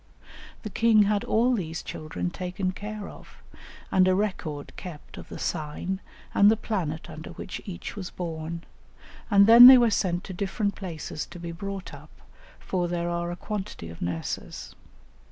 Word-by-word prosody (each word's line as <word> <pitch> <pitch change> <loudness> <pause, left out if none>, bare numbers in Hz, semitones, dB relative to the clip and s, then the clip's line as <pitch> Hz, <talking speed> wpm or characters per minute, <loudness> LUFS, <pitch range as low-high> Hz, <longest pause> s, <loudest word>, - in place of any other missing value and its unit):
The 215 - -5
king 220 +1 +5
had 205 0 +1
all 240 +3 +3
these 165 -7 -3
children 155 +3 -4
taken 185 0 -3
care 210 +2 -6
of, - - -14 0.5
and 185 -1 +5
a 185 - +4
record 175 -8 -3
kept 175 -6 -9
of - - -11
the - - -7
sign 175 +4 -3 0.3
and 200 +1 +6
the 220 - +3
planet 170 -9 -3
under 155 -1 -9
which - - -7
each 185 -4 -7
was 190 -4 -5
born, 165 -1 -5 0.7
and 200 -2 +7
then 235 +3 +11
they 260 0 +11
were 240 -2 +4
sent 180 -4 0
to 190 - -7
different 200 +2 -1
places 165 -5 -6
to 175 - -11
be 170 0 -5
brought 195 +2 -6
up, - - -12 0.5
for 180 -2 -2
there 175 0 -2
are 170 0 -2
a 175 - -4
quantity 190 - -5
of 85 - -12
nurses. 85 -2 -4
185 Hz, 170 wpm, -26 LUFS, 170-205 Hz, 0.7 s, then